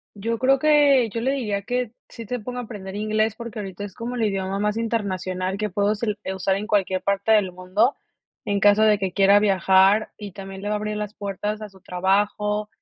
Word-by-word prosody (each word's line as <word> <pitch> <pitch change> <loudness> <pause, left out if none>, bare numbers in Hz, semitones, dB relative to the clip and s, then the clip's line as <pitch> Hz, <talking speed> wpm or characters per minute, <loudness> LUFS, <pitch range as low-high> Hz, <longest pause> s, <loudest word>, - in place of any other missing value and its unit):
Yo 230 +3 -2
creo 265 +3 +3
que, 285 -4 +4
yo 230 - -3
le 260 +4 +1
diría 210 -7 -2
que 245 0 -2 0.2
sí 230 - -9
se 245 +3 -3
ponga 250 +3 -6
a - - -4
aprender 200 -4 -8
inglés, 215 +1 0
porque 235 -2 -7
ahorita 195 0 -6
es 200 -3 -8
como 240 +2 -5
el 230 - 0
idioma 195 -1 -1
más 210 +1 0
internacional 190 -5 -2
que 210 +1 -2
puedo 205 +3 +1
sel 210 -1 -3
eh, 190 - -3
usar 190 0 0
en 205 +2 -4
cualquier 195 -4 +1
parte 200 +2 0
del 205 -4 +4
mundo, 185 +8 +1 0.5
en 200 0 0
caso 205 +1 +5
de 215 -2 +5
que 190 -3 -2
quiera 200 +1 +5
viajar 195 +1 +4
y 205 -2 -8
también 195 0 -9
le 205 - -3
va 210 - 0
a - - 0
abrir 210 0 -3
las 210 0 -4
puertas 205 +1 -4
a 215 - -6
su 190 -1 -19
trabajo. 205 +3 0
210 Hz, 225 wpm, -23 LUFS, 195-220 Hz, 0.5 s, caso